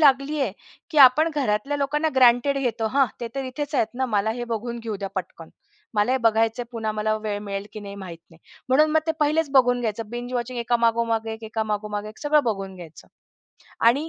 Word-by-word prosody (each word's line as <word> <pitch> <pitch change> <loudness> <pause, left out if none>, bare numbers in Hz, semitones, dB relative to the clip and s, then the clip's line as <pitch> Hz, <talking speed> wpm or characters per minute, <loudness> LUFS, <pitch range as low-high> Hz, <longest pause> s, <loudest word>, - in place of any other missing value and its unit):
लागलीये 275 -2 +3 0.4
की 305 - +1
आपण 280 +5 +7
घरातल्या 270 +1 0
लोकांना 300 +3 0
ग्रँटेड 255 +2 +4
घेतो 230 -4 -1
हां, 275 -2 +5
ते 235 - -3
तर 270 -1 -3
इथेच 290 +3 -5
आहेत 235 - +3
ना, 260 +1 -1
मला 215 -1 0
हे 240 +1 -3
बघून 235 +2 -4
घेऊ 225 -3 -4
द्या 195 0 -5
पटकन. 175 -3 -6 0.5
मला 210 +5 +2
हे 265 - +2
बघायचंय, 225 +2 +2
पुन्हा 220 -2 -2
मला 215 0 0
वेळ 205 -1 -2
मिळेल 200 0 -5
की 215 - -7
नाही 200 -1 -8
माहित 180 -4 -8
नाही. 165 - -18 0.3
म्हणून 305 +4 +4
मग 315 - +3
ते 320 - +2
पहिलेच 305 0 +2
बघून 245 -2 +4
घ्यायचं, 220 -1 -3
बिंज 245 +1 -5
वॉचिंग 245 0 -3
एका 235 +1 +1
मागोमाग, 230 -1 +1
एक 220 0 -6
एका 220 0 -2
मागोमाग 210 -1 -3
एक 215 - -13
सगळं 295 0 +3
बघून 195 -4 -2
घ्यायचं 165 -3 -12 0.8
आणि 280 +7 +3
235 Hz, 205 wpm, -24 LUFS, 215-270 Hz, 0.8 s, आपण